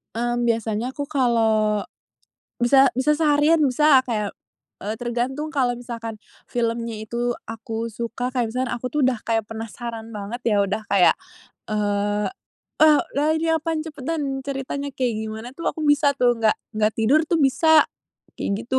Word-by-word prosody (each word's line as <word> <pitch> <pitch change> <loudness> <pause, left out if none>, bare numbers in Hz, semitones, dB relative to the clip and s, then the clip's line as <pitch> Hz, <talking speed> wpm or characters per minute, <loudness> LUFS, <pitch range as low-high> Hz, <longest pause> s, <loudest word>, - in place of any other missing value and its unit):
Mmm, 240 +1 0
biasanya 230 +2 -1
aku 285 - -2
kalau 220 -5 +2 0.8
bisa 265 +2 +5
bisa 300 +3 +3
seharian, 305 +1 +3
bisa, 280 0 +5
kayak, 215 -5 -3 0.5
eee 210 +2 -2
tergantung. 245 +5 -2
Kalau 245 -3 +1
misalkan 230 -3 -6 0.3
filmnya 230 -1 -2
itu 240 +2 -1 0.2
aku 225 0 -5
suka, 235 +3 -4
kayak 240 -3 0
misalkan 255 +1 -2
aku 250 +1 -4
tuh 300 - 0
udah 250 -4 0
kayak 225 -2 0
penasaran 225 +1 -7
banget 215 +3 -6
ya, 220 -3 +2
udah 205 +3 -2
kayak, 195 -2 +5 0.6
eee 205 0 0 0.6
eee, 305 -1 +7 0.2
udah 290 +2 +1
ini 325 - -1
apaan, 320 0 -1
cepetan, 285 -2 -3
ceritanya 280 +1 -4
kayak 255 -3 -1
gimana 220 +2 -6
tuh 335 - -1
aku - - -9
bisa 290 0 +4
tuh, 245 -1 +4
nggak 225 -2 +2 0.2
nggak 215 0 +2
tidur 245 +8 +4
tuh 335 - +3
bisa, 305 +3 +5 0.5
kayak - - -3 0.2
gitu, 260 +1 +1
240 Hz, 155 wpm, -23 LUFS, 225-275 Hz, 0.8 s, eee